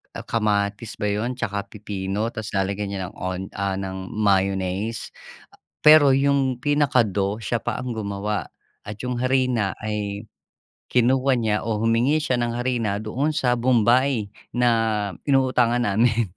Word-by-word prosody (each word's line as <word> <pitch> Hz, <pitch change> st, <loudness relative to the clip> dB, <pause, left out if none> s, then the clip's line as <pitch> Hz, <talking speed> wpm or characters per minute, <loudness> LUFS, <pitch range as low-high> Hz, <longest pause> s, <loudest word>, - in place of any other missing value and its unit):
Ah, -, -, -6 dB
kamatis 105 Hz, -1 st, -1 dB
ba 105 Hz, -1 st, -1 dB
yun? 115 Hz, +5 st, -2 dB
Tsaka 100 Hz, -4 st, -3 dB
pipino 105 Hz, +1 st, -4 dB
tapos 110 Hz, -1 st, -6 dB
lalagyan 100 Hz, +1 st, -1 dB
niya 100 Hz, -1 st, -4 dB
ng -, -, -24 dB
on 90 Hz, 0 st, -3 dB
ah, 100 Hz, -1 st, -2 dB
ng 95 Hz, -1 st, -5 dB
mayonnaise. 100 Hz, +1 st, 0 dB, 0.7 s
Pero 150 Hz, -3 st, +7 dB
yung 135 Hz, -2 st, +2 dB
pinaka-dough 115 Hz, -8 st, +1 dB
siya 120 Hz, +1 st, -1 dB
pa -, -, -2 dB
ang 125 Hz, -2 st, -4 dB
gumawa 100 Hz, 0 st, -3 dB, 0.3 s
at 105 Hz, 0 st, -7 dB
yung 125 Hz, -1 st, -3 dB
harina 125 Hz, -5 st, +1 dB
ay, 105 Hz, 0 st, -4 dB, 0.6 s
kinuha 130 Hz, +2 st, +3 dB
niya 110 Hz, -3 st, +1 dB
o 105 Hz, -2 st, -1 dB
humingi 120 Hz, +6 st, +3 dB
siya 130 Hz, -4 st, 0 dB
ng 120 Hz, -1 st, -1 dB
harina 120 Hz, -5 st, -1 dB
doon 120 Hz, +7 st, -1 dB
sa 125 Hz, -4 st, +1 dB
bombay 120 Hz, -1 st, +2 dB, 0.3 s
na 125 Hz, 0 st, +3 dB, 0.6 s
inuutangan 125 Hz, -3 st, +2 dB
namin. 115 Hz, +1 st, +2 dB
110 Hz, 140 wpm, -23 LUFS, 100-125 Hz, 0.7 s, Pero